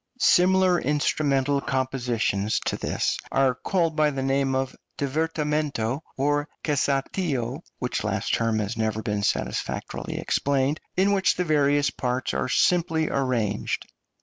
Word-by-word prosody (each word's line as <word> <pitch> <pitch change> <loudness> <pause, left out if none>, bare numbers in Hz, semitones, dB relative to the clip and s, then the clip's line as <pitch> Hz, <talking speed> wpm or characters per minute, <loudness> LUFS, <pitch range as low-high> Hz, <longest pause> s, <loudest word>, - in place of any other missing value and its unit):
Similar 185 -4 +4
instrumental 145 -1 +1
compositions 125 -6 0
to - - -1
this - - -1
are 135 -1 +3
called 165 +4 0
by 155 -1 +3
the 135 -2 -3
name 135 0 +1
of 130 0 -1 0.2
divertimento 150 -3 -1 0.2
or 145 +2 +1
cassatio 140 -2 -1 0.2
(which - - -2
last - - -1
term 115 -1 +1
has 105 +1 -2
never 110 -1 -1
been 105 -1 -1
satisfactorily - - -2
explained), 140 +2 0 0.2
in 195 +2 +4
which 190 -2 +3
the 180 - 0
various 145 -2 +3
parts 125 0 -2
are - - -1
simply 160 0 +2
arranged. 120 -7 -1
140 Hz, 125 wpm, -25 LUFS, 125-155 Hz, 0.2 s, Similar